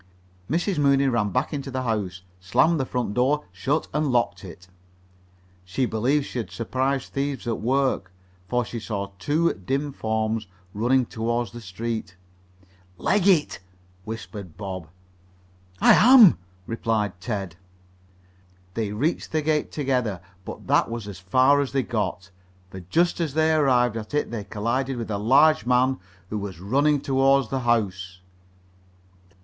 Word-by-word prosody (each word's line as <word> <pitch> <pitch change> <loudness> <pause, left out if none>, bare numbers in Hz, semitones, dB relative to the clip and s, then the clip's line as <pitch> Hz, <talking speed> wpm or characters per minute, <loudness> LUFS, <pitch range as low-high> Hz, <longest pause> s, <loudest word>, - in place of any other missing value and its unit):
Mrs. 175 +3 0
Mooney 140 -1 +3
ran 120 -5 +1
back 130 +8 -1
into 140 -2 -4
the 130 0 -3
house, 100 -6 -2 0.2
slammed 150 - +2
the 135 - -1
front 125 -5 -2
door, 135 +5 +1
shut 135 - -1
and 150 0 +1
locked 120 -7 0
it. 90 0 -11 1.0
She 95 +8 -1
believed 125 +6 +1
she 125 - -5
had 115 - -4
surprised 130 +3 -2
thieves 140 0 -2
at 115 -2 -2
work, 130 -6 0 0.4
for 125 -1 +1
she 115 - -6
saw 100 -3 -4
two 160 +9 +1
dim 135 +9 -3
forms 110 -2 -2 0.3
running 125 +4 +2
toward 115 0 -2
the 120 +4 -10
street. 110 0 -5 0.8
"Leg 200 -1 +1
it!" 175 -7 +3 0.4
whispered 105 -5 -8
Bob. 95 -5 -6 0.9
"I - - +7
am," 235 - +8 0.3
replied 110 -5 -2
Ted. 100 -6 -4 1.2
They 110 -1 -2
reached 145 +11 -1
the 155 -1 0
gate 155 0 0
together, 125 - -1 0.3
but - - -8
that - - +2
was 115 -3 -5
as 100 -3 -8
far 130 +9 +4
as 140 -1 -4
they 135 -1 +1
got, 100 -5 -3 0.4
for 95 - -7
just 165 - +1
as 155 -4 -2
they 160 0 +3
arrived 125 -6 +3
at 115 +5 -5
it 150 - 0
they 110 -4 -4
collided 120 +6 -2
with 115 -2 -5
a 100 - -1
large 140 +6 +4
man 125 +1 +3 0.3
who 105 - -2
was 100 -4 -6
running 140 +9 +2
toward 135 -2 +2
the 135 - 0
house. 95 -7 -1
120 Hz, 150 wpm, -24 LUFS, 105-140 Hz, 1.2 s, am